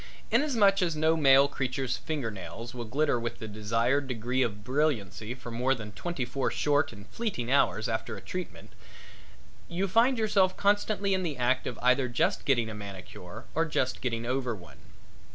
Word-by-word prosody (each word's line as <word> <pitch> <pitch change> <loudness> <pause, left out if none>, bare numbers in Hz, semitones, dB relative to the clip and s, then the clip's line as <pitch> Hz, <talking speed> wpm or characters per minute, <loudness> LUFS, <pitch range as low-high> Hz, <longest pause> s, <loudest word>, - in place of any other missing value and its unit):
Inasmuch 220 -10 +4
as 170 -3 +1
no 160 +1 +3
male 140 -3 +6
creature's 130 -2 -2
finger 145 -8 -3
nails 105 +5 -8
will 120 -2 -5
glitter 140 +2 +1
with 115 0 -4
the 110 - -7
desired 115 +6 0
degree 125 +1 -1
of 105 -4 -1
brilliancy 125 - -1
for 120 -2 -9
more 125 +3 +1
than 105 -3 -8
twenty 140 - -3
four 130 +2 -1
short 145 0 +1
and 100 -1 -12
fleeting 180 - -3
hours 135 -5 +3
after 110 -1 -3
a - - -10
treatment 185 -2 -7 1.0
you 185 +3 -1
find 235 +7 +4
yourself 195 -4 +2
constantly 205 0 +2
in 190 - +1
the 160 -6 -3
act 125 +1 +1
of 120 - -4
either 125 +1 +4
just 165 +11 0
getting 120 -5 +2
a 110 - -5
manicure 100 0 -9
or 165 - +2
just 130 -5 -1
getting 115 -2 -2
over 125 -1 -1
one. 80 -10 -14
130 Hz, 175 wpm, -29 LUFS, 115-160 Hz, 1.0 s, male